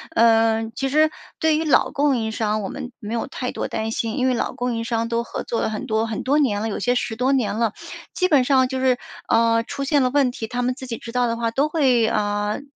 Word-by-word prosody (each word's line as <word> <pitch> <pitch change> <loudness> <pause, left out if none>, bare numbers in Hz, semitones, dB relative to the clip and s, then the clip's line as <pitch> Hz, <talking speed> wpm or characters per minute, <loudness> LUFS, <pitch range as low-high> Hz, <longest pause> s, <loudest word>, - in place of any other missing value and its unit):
呃， 225 -1 +4
其 270 +4 -2
实 310 +2 +3 0.3
对 315 -1 +3
于 320 - -1
老 300 - +3
供 285 -2 +2
应 220 -1 -2
商， 215 -1 -1
我 195 - -4
们 265 -2 -7
没 215 +1 -6
有 235 - -2
太 255 -2 -4
多 - - -3
担 220 0 -3
心， 225 +2 -2
因 260 -1 +2
为 255 - +2
老 245 - -2
供 245 0 -2
应 230 - -2
商 230 -1 -1
都 235 0 0
合 - - -5
作 230 - -2
了 - - 0
很 220 +4 -4
多 220 -2 0
很 220 -2 -4
多 285 +3 +2
年 215 -8 +1
了， 225 - -2
有 205 - -3
些 245 0 +1
10 240 -2 -2
多 255 +3 +2
年 240 -5 0
了， 230 -2 +1 0.4
基 365 - +1
本 285 -6 +5
上 260 -1 +4
就 260 0 -3
是， 260 -1 +2 0.3
呃， 230 0 +3
出 275 +4 -5
现 285 +1 +2
了 255 - +2
问 270 -1 +2
题， 225 -2 -6
它 245 +2 -3
们 250 +1 0
自 260 0 -9
己 230 -2 -4
知 230 - -9
道 245 0 +1
的 230 - -1
话 230 -1 -1
都 275 +5 +1
会， 260 -8 +3
呃， 205 +1 -1
240 Hz, 280 characters per minute, -22 LUFS, 225-265 Hz, 0.4 s, 本